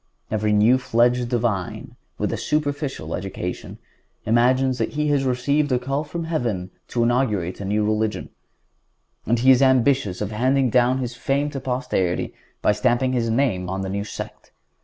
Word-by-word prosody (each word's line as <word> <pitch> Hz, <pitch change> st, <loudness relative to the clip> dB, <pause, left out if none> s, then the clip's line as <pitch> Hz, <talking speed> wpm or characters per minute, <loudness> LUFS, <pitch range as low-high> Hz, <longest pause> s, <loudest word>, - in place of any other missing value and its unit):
Every 105 Hz, 0 st, 0 dB
new 110 Hz, +5 st, +4 dB
fledged 120 Hz, 0 st, +2 dB
divine, 115 Hz, -6 st, -2 dB, 0.2 s
with -, -, -1 dB
a -, -, 0 dB
superficial 145 Hz, -, -2 dB
education, 90 Hz, -1 st, -5 dB, 0.5 s
imagines 125 Hz, +3 st, +2 dB
that -, -, -1 dB
he 150 Hz, 0 st, 0 dB
has 140 Hz, -2 st, +2 dB
received 140 Hz, +3 st, +1 dB
a 125 Hz, -, +3 dB
call 135 Hz, +4 st, -2 dB
from 170 Hz, +2 st, -5 dB
heaven 115 Hz, -, -2 dB, 0.2 s
to 120 Hz, -, 0 dB
inaugurate 110 Hz, -8 st, 0 dB
a -, -, -4 dB
new 105 Hz, +2 st, +1 dB
religion, 110 Hz, 0 st, -1 dB, 1.0 s
and 120 Hz, +3 st, +2 dB
he 130 Hz, +3 st, +5 dB
is 130 Hz, 0 st, +5 dB
ambitious 130 Hz, -6 st, +3 dB
of 105 Hz, -1 st, -3 dB
handing 130 Hz, +3 st, +2 dB
down 125 Hz, +1 st, +3 dB
his 125 Hz, -2 st, -3 dB
fame 140 Hz, +3 st, -1 dB
to 135 Hz, -, -4 dB
posterity 125 Hz, -9 st, -1 dB, 0.3 s
by -, -, +4 dB
stamping 120 Hz, +5 st, +1 dB
his 115 Hz, -2 st, 0 dB
name 110 Hz, -7 st, 0 dB
on 95 Hz, +1 st, -3 dB
a -, -, -4 dB
new 100 Hz, +1 st, -2 dB
sect. 105 Hz, -, -8 dB
120 Hz, 165 wpm, -23 LUFS, 105-135 Hz, 1.0 s, he